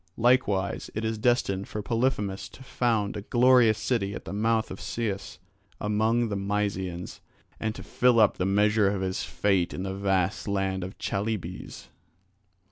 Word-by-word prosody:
Likewise 115 -5 +2
it 110 +1 -2
is 110 -1 -2
destined 105 -5 +1
for 105 - -5
Polyphemus 115 -4 -1
to 130 - -13
found 115 -6 0
a 105 - -4
glorious 120 0 +4
city 105 -3 -1
at - - -8
the - - -6
mouth 110 +2 +1
of 95 - -7
Cius 105 -4 -4 0.4
among 110 +3 +1
the 100 - -2
Mysians 100 -3 -2 0.4
and 110 0 -2
to - - -8
fill 125 -2 +3
up 110 - +4
the 90 - 0
measure 105 +1 +3
of 100 -1 -2
his 95 0 -2
fate 95 -4 0
in 90 - -4
the 95 0 -3
vast 95 0 0
land 95 -2 -1
of 95 +2 -7
the - - -14
Chalybes. 100 -3 -4
105 Hz, 165 wpm, -27 LUFS, 95-115 Hz, 0.4 s, glorious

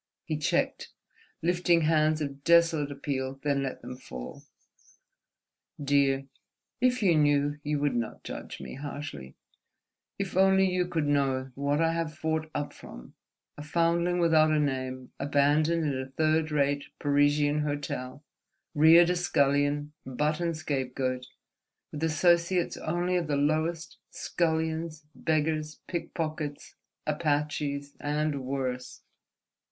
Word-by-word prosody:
He 155 - -2
checked, 150 - 0 0.5
lifting 175 0 +3
hands 155 0 +2
of 140 -1 -5
desolate 165 -3 +4
appeal, 135 -1 -3
then 140 -2 +1
let 135 -1 -4
them 125 - -7
fall. 65 - -9 1.4
"Dear, 140 -1 +2 0.6
if 250 -2 +2
you 175 -4 +4
knew 145 -1 +2
you 150 0 -1
would 145 -2 +1
not 120 -2 -3
judge - - -7
me - - -8
harshly. 135 - -7 0.8
If 195 -3 -4
only 190 0 +5
you 180 -1 +1
could 160 -4 -1
know 135 -2 +1
what 140 +3 0
I 165 0 +2
have 165 -2 -2
fought 160 0 -2
up 145 0 -3
from, - - -12 0.5
a - - -5
foundling 170 +3 +1
without 160 -2 +4
a 155 -1 +2
name 130 -3 -2
abandoned 150 +3 +2
in 140 -3 -1
a 130 - -8
third 155 +3 +1
rate 145 -1 +1
Parisian 145 +1 +2
hotel, 145 -2 -4 0.5
reared 165 +3 +7
a - - +1
scullion, 145 -3 +1
butt 150 +4 -1
and 170 -2 -1
scapegoat, 130 -3 -2 0.6
with 150 +1 -5
associates 170 +2 +2
only 175 +3 -1
of 170 -3 -1
the 145 -1 0
lowest, 155 +3 -1
scullions, 160 -1 -2
beggars, 155 -1 -1
pickpockets, 155 -4 -4 0.3
Apaches, 145 -2 -1
and 150 -1 -1
worse—!" 130 -1 -4
150 Hz, 125 wpm, -28 LUFS, 140-160 Hz, 1.4 s, reared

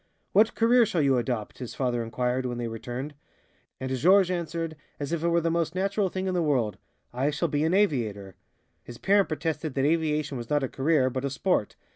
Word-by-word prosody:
"What 215 +3 +4
career 235 +2 +5
shall 175 -8 0
you 135 -2 +3
adopt?" 115 -3 -3
his 125 - -7
father 125 -3 0
inquired, 125 +2 -1
when 120 -1 -4
they 120 -1 -3
returned. 120 +5 -5 0.7
And 130 0 -2
Georges 185 +7 +4
answered, 165 -2 -3 0.2
as 145 0 -4
if 170 -1 -1
it - - +2
were 170 0 +3
the 165 0 0
most 170 0 -1
natural 195 +1 0
thing 185 +1 -3
in 185 - -1
the 180 - +1
world, 130 -9 0 0.3
"I 130 +4 +1
shall 150 +3 -1
be 145 0 0
an 165 +3 +2
aviator." 110 - 0 0.5
His 120 - -10
parent 200 0 +3
protested 155 -1 -3
that 135 0 +1
aviation 150 -3 0
was 120 - -8
not 145 -1 +1
a - - 0
career, 135 -2 +2
but 130 +1 -3
a 140 - 0
sport. 135 - 0
150 Hz, 210 wpm, -27 LUFS, 125-170 Hz, 0.7 s, career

